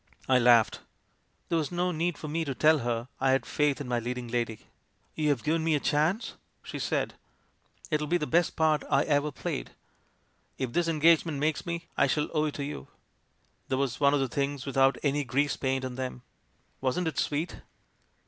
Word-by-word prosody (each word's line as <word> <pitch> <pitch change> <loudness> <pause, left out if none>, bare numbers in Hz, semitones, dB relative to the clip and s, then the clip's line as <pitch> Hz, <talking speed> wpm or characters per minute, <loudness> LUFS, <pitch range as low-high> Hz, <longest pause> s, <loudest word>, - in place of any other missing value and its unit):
"I 130 -1 +5
laughed. 120 -2 +5 0.7
There 165 - +2
was 155 - -3
no 180 +1 0
need 170 0 -1
for 155 - -7
me 165 +2 -1
to 135 -3 -3
tell 155 +2 +4
her 120 -1 -2
I 135 - +2
had 135 0 +2
faith 150 -1 +1
in 140 - -5
my 120 -1 0
leading 125 +1 -4
lady. 115 -2 -2 0.3
" - - -41
'You 155 -1 +1
have 135 -6 +1
given 160 +1 +1
me 160 -1 +2
a - - +1
chance!' 160 - 0 0.3
she - - -6
said. - - -1 0.8
'It'll 150 -1 0
be 175 +3 +2
the 150 - -2
best 170 +2 +2
part 155 -1 +2
I - - +3
ever 150 0 +1
played. - - -5 0.8
If 130 -3 -3
this 175 -1 +1
engage 165 0 +4
ment 160 -4 -4
makes 155 +3 -1
me, 170 0 -3
I - - +4
shall 150 -1 0
owe 155 -1 +2
it 150 - -3
to 140 - -3
you' 145 +1 -6 0.8
There 130 - 0
was 135 -3 -1
one 140 0 +4
of - - +1
the 135 - +1
things 140 +1 -2
without 135 -1 +3
any 145 0 +1
grease 140 +3 0
paint 130 -1 -1
on 130 0 -6
'em. 125 -1 -4 0.6
Wasn't 135 +7 0
it 155 - -2
sweet? 155 +4 -1
145 Hz, 205 wpm, -28 LUFS, 130-155 Hz, 0.8 s, I